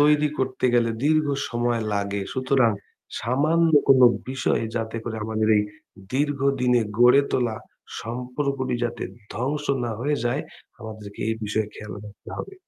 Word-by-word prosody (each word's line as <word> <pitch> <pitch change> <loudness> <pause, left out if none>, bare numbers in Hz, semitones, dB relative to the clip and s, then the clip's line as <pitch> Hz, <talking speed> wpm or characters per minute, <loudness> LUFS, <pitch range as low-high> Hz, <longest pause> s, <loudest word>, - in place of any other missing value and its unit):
তৈরি 150 0 +5
করতে 130 -1 -2
গেলে 115 -1 +3
দীর্ঘ 155 0 +3 0.2
সময় 120 -1 0
লাগে। 100 0 -1
সুতরাং 130 -2 +3 0.5
সামান্য 155 +7 +2 0.2
কোনো 130 -2 +7 0.2
বিষয় 130 -3 0
যাতে 115 0 -3
করে 110 -2 -4
আমাদের 110 0 0
এই 105 - +4 0.5
দীর্ঘ 145 0 +1 0.2
দিনে 125 -1 +4 0.2
গড়ে 125 +3 +7
তোলা 120 -4 0 0.4
সম্পর্কটি 125 +2 -2
যাতে 120 -1 -3 0.3
ধ্বংস 145 +5 -2 0.2
না 120 - -2
হয়ে 145 +3 +1
যায়, 125 +4 +1 0.4
আমাদেরকে 110 -2 -9
এই 110 - +1
বিষয়ে 110 0 -1
খেয়াল 105 -3 -8
রাখতে 105 0 -12
হবে। - - -6
125 Hz, 140 wpm, -24 LUFS, 110-140 Hz, 0.5 s, কোনো